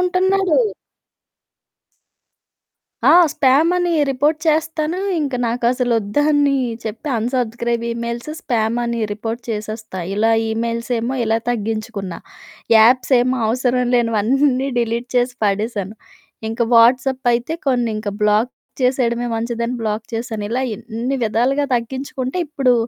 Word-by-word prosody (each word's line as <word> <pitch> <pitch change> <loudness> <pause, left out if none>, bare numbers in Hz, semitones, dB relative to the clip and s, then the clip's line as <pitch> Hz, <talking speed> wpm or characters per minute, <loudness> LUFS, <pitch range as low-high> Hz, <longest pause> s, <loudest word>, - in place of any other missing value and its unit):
ఉంటున్నాడు. 370 0 +2 2.5
ఆ! - - +8 0.2
స్పామనీ 320 +5 +3 0.2
రిపోర్ట్ 290 +4 +1
చేస్తాను. 315 +1 0 0.2
ఇంక 275 -3 -2
నాకసలొద్దని 245 +4 +1 0.3
చెప్పి 225 +8 -5
అన్‌సబ్‌స్క్రై‌బ్ 235 0 -1
ఇమెయిల్స్ 235 +3 -4
స్పామని 235 0 -1
రిపోర్ట్ 225 +3 -5
చేసేస్తా. 215 -2 -5 0.2
ఇలా 220 +2 +2 0.2
ఈమెయిల్సేమో 230 +2 -2
ఇలా 225 0 +1
తగ్గించుకున్నా. 215 -5 -3 0.6
యాప్సేమో 250 +2 +4
అవసరం 250 +1 +1
లేనివన్నీ 250 +4 +2
డిలీట్ 235 +1 -1
చేసి 245 0 +1
పడేశాను. 205 0 -1 0.5
ఇంక 225 +2 -6
వాట్సప్పయితే 245 +2 +3
కొన్నింక 230 -5 0
బ్లాక్ 210 +4 +2 0.3
చేసెయడమే 245 -2 +1
మంచిదని 235 +1 -2
బ్లాక్ 215 0 -2
చేశాను. 225 -2 -4
ఇలా 255 +3 0
ఎన్ని 235 +6 -4
విధాలుగా 245 +6 +1
తగ్గించుకుంటే, 260 +4 -4
ఇప్పుడూ 270 -4 +2
240 Hz, 95 wpm, -19 LUFS, 225-265 Hz, 2.5 s, ఆ